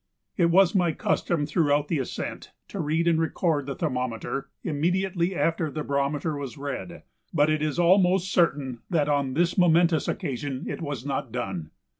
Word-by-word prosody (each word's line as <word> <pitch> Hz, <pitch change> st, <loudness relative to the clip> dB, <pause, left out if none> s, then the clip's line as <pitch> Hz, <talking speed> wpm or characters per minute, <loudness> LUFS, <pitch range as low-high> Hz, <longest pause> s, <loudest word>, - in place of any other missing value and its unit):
It 170 Hz, -3 st, +3 dB
was 185 Hz, +1 st, +5 dB
my 175 Hz, -5 st, +2 dB
custom 150 Hz, 0 st, 0 dB
throughout 150 Hz, -2 st, +1 dB
the 155 Hz, -, 0 dB
ascent 130 Hz, -, -5 dB, 0.2 s
to 200 Hz, -, -6 dB
read 160 Hz, +1 st, 0 dB
and 165 Hz, -1 st, +3 dB
record 160 Hz, -3 st, 0 dB
the 140 Hz, -, -3 dB
thermometer 125 Hz, -2 st, -3 dB
immediately 180 Hz, +3 st, 0 dB
after 165 Hz, -1 st, 0 dB
the 155 Hz, +1 st, -4 dB
barometer 140 Hz, +3 st, -1 dB
was 140 Hz, -5 st, -6 dB
read, 145 Hz, +5 st, -6 dB, 0.3 s
but 150 Hz, -1 st, +3 dB
it 155 Hz, -1 st, 0 dB
is 155 Hz, 0 st, -1 dB
almost 185 Hz, +1 st, +3 dB
certain 140 Hz, -8 st, +1 dB
that 160 Hz, -6 st, +1 dB
on 140 Hz, -3 st, 0 dB
this 175 Hz, +4 st, +2 dB
momentous 170 Hz, -2 st, +4 dB
occasion 140 Hz, -, -3 dB
it -, -, -4 dB
was 145 Hz, -5 st, -4 dB
not 140 Hz, -2 st, -3 dB
done. 95 Hz, -10 st, -4 dB
155 Hz, 165 wpm, -26 LUFS, 140-175 Hz, 0.3 s, was